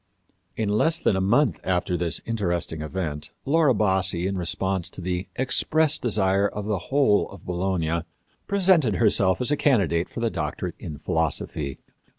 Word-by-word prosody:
In 110 - -1
less 110 +11 +2
than - - +1
a 95 - 0
month 115 - +2
after 90 -1 0
this 85 -1 0
interesting 90 -8 -2
event 75 -3 -4 0.2
Laura 145 -3 +3
Bassi, 95 -4 +1
in 95 +1 -1
response 95 +1 -1
to - - -11
the 90 +1 -3
expressed 155 +4 +2
desire 100 -3 +2
of 105 0 -6
the 105 -3 -1
whole 135 -7 +3
of 100 -3 -13
Bologna, 85 -2 -1 0.5
presented 180 - +3
herself 100 -4 +3
as 125 - 0
a - - +4
candidate 95 - +1
for - - -7
the 115 -1 0
doctorate 75 -3 -3
in 75 - -7
philosophy. 80 -4 -2
95 Hz, 160 wpm, -24 LUFS, 85-115 Hz, 0.5 s, a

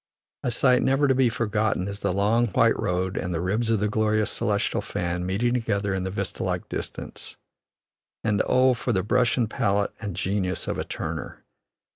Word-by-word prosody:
A - - -1
sight 125 +1 +3
never 135 +2 +3
to 135 - +4
be 130 -2 +3
forgotten 110 -4 0
is 100 0 -5
the - - 0
long 105 +5 +2
white 100 - +3
road 90 +1 -1
and 90 - -2
the 85 - -1
ribs 105 +7 0
of 110 -2 +2
the 105 - +1
glorious 110 0 +1
celestial 100 -1 0
fan 90 +1 -3
meeting 115 +6 +1
together 100 -5 0
in 95 -1 -1
the 95 - -2
vista 95 - -3
like - - -2
distance; - - -6 0.9
and 105 -2 +2
oh, 130 0 +4
for 120 0 -2
the 95 -2 +1
brush 125 +4 +2
and 120 -3 +2
palette 100 -2 0
and 100 -5 -4
genius 95 -1 -1
of - - -2
a - - 0
Turner! - - -5
105 Hz, 190 wpm, -25 LUFS, 95-120 Hz, 0.9 s, to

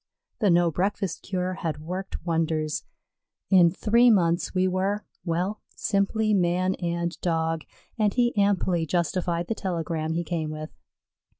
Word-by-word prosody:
The 210 - +3
no 170 -1 +4
breakfast 190 +1 -1
cure 185 -1 -2
had 160 -4 -3
worked 180 +5 -6
wonders; 160 -2 0 0.7
in 180 -3 +7
three 230 +7 +4
months 175 -5 +2
we 185 0 +2
were 195 +3 -1 0.2
well, 180 +5 -1
simply 215 +2 +1
man 185 0 +2
and 170 0 -1
Dog, 165 -2 0 0.3
and 210 -1 +3
he 240 +1 +1
amply 190 -5 +2
justified 175 0 0
the 225 - -1
telegram 165 -5 -2
he 170 +1 -1
came 160 -2 -2
with. 155 0 -6
175 Hz, 135 wpm, -26 LUFS, 165-195 Hz, 0.7 s, in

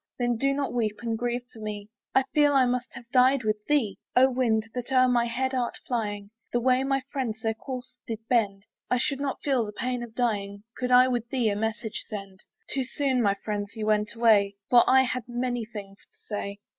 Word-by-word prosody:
Then 240 -1 +1
do 275 +4 +1
not 275 -1 -1
weep 220 -3 0
and 230 -1 -1
grieve 240 +1 -2
for 225 - -12
me; 210 -1 -6 0.2
I 265 - +5
feel 295 -1 +4
I 265 -2 +6
must 250 0 -1
have 235 0 -10
died 255 0 +4
with 215 -1 -1
thee. 275 -9 +1 0.2
Oh 260 +1 +6
wind 225 -4 +1
that 245 +1 -4
o'er 255 -1 +5
my 240 -1 +3
head 260 +3 -1
art 245 -2 -1
flying, 205 -4 -3 0.2
The 240 - +1
way 255 +1 +3
my 270 -1 0
friends 230 -6 -3
their 225 0 +1
course 250 +1 -8
did 225 - -3
bend, 205 -5 +1 0.2
I 250 - +3
should 275 +2 -1
not 280 -1 -3
feel 265 -5 +2
the 210 - -5
pain 250 +3 -3
of 235 -2 -8
dying, 200 -4 -1
Could 250 0 -2
I 250 +1 +7
with 240 -2 -2
thee 245 -4 +1
a - - -1
message 220 +1 -3
send. 195 -3 -7 0.3
Too 265 - -1
soon, 260 0 0
my 200 -3 +3
friends, 205 0 -3
you 220 -1 -3
went 210 +1 +1
away; 210 -4 +4 0.2
For 240 -1 +8
I 265 0 +6
had 250 -2 -3
many 245 -1 -2
things 200 -3 -10
to - - -25
say. 200 -1 -5
240 Hz, 220 wpm, -27 LUFS, 215-255 Hz, 0.3 s, For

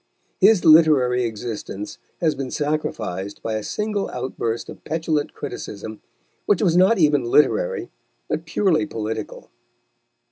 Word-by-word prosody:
His 205 -1 +5
literary 145 -6 +5
existence 110 -2 -6 0.2
has 160 -3 +2
been 135 -2 -5
sacrificed 110 -11 -3
by 110 - -2
a 110 - -1
single 210 - -2
outburst 120 -2 -3
of - - -11
petulant 155 -1 -2
criticism, 110 -6 -7 0.5
which 205 0 +3
was 175 -4 +3
not 190 +5 +5
even 150 -6 +3
literary, 470 - +2 0.4
but - - -3
purely 160 -6 +1
political. 110 -3 -5
145 Hz, 120 wpm, -22 LUFS, 115-170 Hz, 0.5 s, His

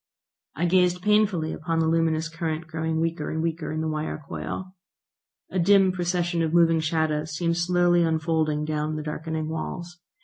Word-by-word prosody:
I 170 - 0
gazed 180 0 +2
painfully 210 -6 +2
upon 165 +1 -2
the 165 - +2
luminous 160 0 +1
current 165 -1 -3
growing 160 0 -2
weaker 165 -2 -1
and 160 - -3
weaker 165 -1 -2
in 155 0 -2
the 160 - -1
wire 155 0 -3
coil. 185 0 -5 0.8
A 190 - 0
dim 195 +1 +5
procession 175 -1 -1
of 160 0 0
moving 165 -1 +5
shadows 155 -1 -1
seemed 170 +1 0
slowly 175 0 +3
unfolding 160 -2 +1
down 155 0 -2
the 155 - -4
darkening 155 +1 -4
walls. 175 +2 -5
165 Hz, 165 wpm, -25 LUFS, 155-175 Hz, 0.8 s, dim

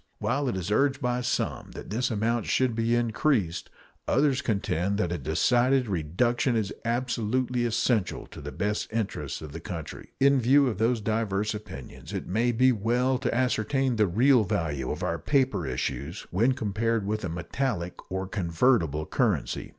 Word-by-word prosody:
While 140 -2 0
it - - -2
is 95 +2 -3
urged 135 +4 +2
by 125 -2 0
some 120 -1 -2
that - - -9
this 120 +4 0
amount 115 +1 0
should 130 -2 +2
be 115 +1 +1
increased, 115 - 0 0.4
others 140 -1 +2
contend 100 - -1
that 90 -5 0
a 90 - -1
decided 120 - +2
reduction 105 - 0
is 105 -3 -1
absolutely 120 +1 0
essential 115 -2 0
to - - -11
the - - -6
best 105 +1 -2
interests 95 - -3
of 75 - -8
the 80 - -7
country. 80 -2 -7
In 140 -1 +4
view 135 +4 +5
of 110 -6 -2
these 115 +1 +2
diverse 105 -1 0
opinions, 105 -11 -9
it - - -3
may 115 +6 +1
be 130 +2 +4
well 125 +4 +1
to 130 -2 -1
ascertain 125 +1 +1
the 105 -1 +4
real 120 +6 +4
value 80 -10 -2
of - - -3
our - - -1
paper 130 - +1
issues 70 +5 -3
when 115 +9 +3
compared 115 -2 -1
with 110 +1 -2
a 90 - -2
metallic 90 +2 -2 0.2
or 95 +1 -2
convertible 85 - +1
currency. - - -1
115 Hz, 165 wpm, -27 LUFS, 95-125 Hz, 0.4 s, view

